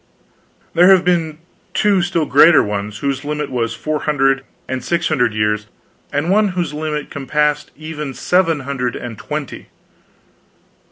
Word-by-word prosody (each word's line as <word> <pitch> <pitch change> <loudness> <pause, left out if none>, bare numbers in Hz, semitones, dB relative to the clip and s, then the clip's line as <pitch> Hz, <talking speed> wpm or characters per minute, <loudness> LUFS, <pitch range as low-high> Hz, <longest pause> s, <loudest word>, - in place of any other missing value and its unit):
"There 175 +2 +6
have 190 -3 +6
been 165 -4 +1 0.4
two 205 -3 +3
still 175 -3 0
greater 160 0 +6
ones, 105 0 -4
whose 135 0 -1
limit 150 -1 -3
was 115 -2 -1
four 155 +3 -2
hundred 135 -2 +1 0.2
and 130 -1 -3
six 170 -1 0
hundred 125 -8 +1
years, 105 0 0 0.4
and 150 +5 0
one 210 +1 +4
whose 170 -4 -1
limit 150 -1 -4
compassed 150 +2 0
even 150 -3 -6
seven 165 -5 +1
hundred 130 -2 -3
and 120 -2 -6
twenty." 150 +4 -6
150 Hz, 145 wpm, -18 LUFS, 130-165 Hz, 0.4 s, There